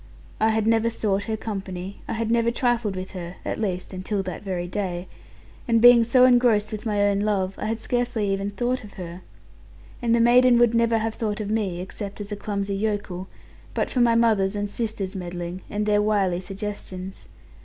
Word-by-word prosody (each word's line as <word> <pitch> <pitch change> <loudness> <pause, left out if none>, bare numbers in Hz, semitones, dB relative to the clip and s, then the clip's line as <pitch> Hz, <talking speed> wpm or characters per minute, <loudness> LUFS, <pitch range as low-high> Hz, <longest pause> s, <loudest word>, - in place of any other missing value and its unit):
I 220 - +3
had 220 -1 +1
never 225 0 +3
sought 205 -3 -1
her 220 -1 -2
company, 195 -3 -6
I - - -2
had 225 0 -1
never 235 0 +3
trifled 235 -4 0
with 185 0 -5
her 180 -1 -7
(at - - -3
least 185 -3 -3
until 195 +2 -2
that 185 -1 -6
very 180 -3 -3
day), 180 -1 -3 0.6
and 230 -1 +4
being 240 0 +8
so 250 +2 +5
engrossed 240 -4 +4
with 215 +1 -5
my 205 -1 +1
own 200 -1 +2
love, 200 -2 0
I 215 - -2
had 225 +1 -2
scarcely 240 -5 0
ever 195 +1 -2
thought 245 +4 -1
of 205 - -12
her. 175 0 -8 0.8
And 235 -1 +2
the - - +2
maiden 245 +1 +6
would 240 -1 +4
never 230 -1 +3
have 225 0 -1
thought 215 -2 -3
of 210 -1 -3
me, 195 -5 -1
except 200 +2 -7
as 205 0 -7
a - - -1
clumsy 200 -1 -3
yokel, 205 -3 -2 0.5
but - - -1
for 250 - +1
my 235 -1 +4
mother's 215 -4 +3
and 205 0 -1
sister's 205 -2 -3
meddling, 175 0 -5
and 210 +1 -2
their 210 0 +3
wily 200 -4 +1
suggestions. 190 -1 -6
210 Hz, 195 wpm, -24 LUFS, 190-230 Hz, 0.8 s, being